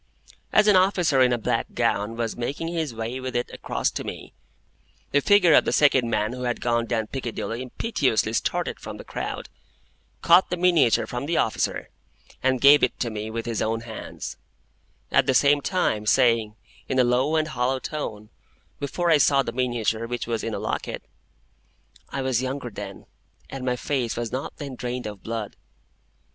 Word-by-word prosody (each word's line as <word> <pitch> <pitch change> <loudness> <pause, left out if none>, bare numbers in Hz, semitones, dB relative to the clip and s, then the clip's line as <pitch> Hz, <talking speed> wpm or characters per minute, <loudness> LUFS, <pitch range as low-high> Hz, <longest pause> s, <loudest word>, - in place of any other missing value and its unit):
As 210 - +5
an 210 -2 +5
officer 180 -7 +3
in 125 -1 +5
a 120 - +2
black 115 0 -2
gown 115 -1 0
was 115 -1 -2
making 140 +7 -3
his 165 -5 -2
way 115 +3 -4
with 130 -1 -5
it 120 - -1
across - - -2
to - - -4
me, - - -8 0.8
the 145 - +3
figure 190 -1 +5
of - - +7
the - - -1
second 130 -5 +4
man 110 +1 0
who 125 - -7
had 120 -1 -1
gone 120 -1 0
down 110 -2 0
Piccadilly 120 -1 -4
impetuously 130 - 0
started - - -1
from - - -8
the - - -9
crowd, - - -5 0.8
caught 170 +2 +6
the 180 - -2
miniature 170 -9 +3
from 125 +3 -5
the 170 - 0
officer, 110 - 0 0.5
and 130 -1 +1
gave 140 +1 +8
it 125 - 0
to 120 - -1
me 110 0 -5
with 115 0 -4
his 115 -3 -2
own 115 +1 -1
hands, 115 -1 -7 0.7
at - - +3
the 130 - +3
same 145 +1 +4
time 110 - 0
saying, 115 -4 +3 0.3
in 130 - 0
a 130 - +6
low 125 +5 +2
and 155 -1 +1
hollow 130 -1 0
tone,—before 140 +5 -5
I 155 - +5
saw 140 -1 +4
the 115 - -4
miniature, 115 -2 -1
which 120 +1 -3
was 115 -1 -2
in - - -3
a - - -3
locket,—"I - - -8
was 130 -2 +1
younger 130 -1 -4
then, 100 -2 -8 0.5
and 135 -1 -6
my 125 -1 0
face 125 -2 -2
was 120 -2 -3
not 130 +2 -5
then 140 -2 -6
drained 125 0 -4
of 105 -2 -7
blood." 110 -2 -5
125 Hz, 180 wpm, -24 LUFS, 115-140 Hz, 0.8 s, gave